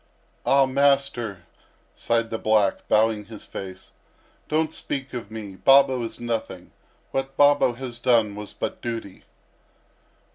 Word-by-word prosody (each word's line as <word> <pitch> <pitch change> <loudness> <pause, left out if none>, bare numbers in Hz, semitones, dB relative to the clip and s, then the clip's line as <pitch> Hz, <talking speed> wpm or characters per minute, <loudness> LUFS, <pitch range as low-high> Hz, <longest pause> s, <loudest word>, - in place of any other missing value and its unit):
"Ah, 135 0 +5
master," 135 -7 +1 0.5
sighed 115 -1 0
the 110 - -3
black, 110 -3 +1
bowing 110 -1 +2
his 110 0 -11
face, 95 -1 -9 0.6
"don't 155 +1 0
speak 135 -1 -4
of 120 -5 -6
me; 105 -3 -8
Babo 135 +5 +5
is 115 - -6
nothing; 115 -6 -4 0.4
what 135 0 -3
Babo 145 -3 +5
has 120 -1 -7
done 115 -4 +3
was 105 0 -7
but - - -5
duty." 115 -5 -6
115 Hz, 130 wpm, -24 LUFS, 105-135 Hz, 0.6 s, Ah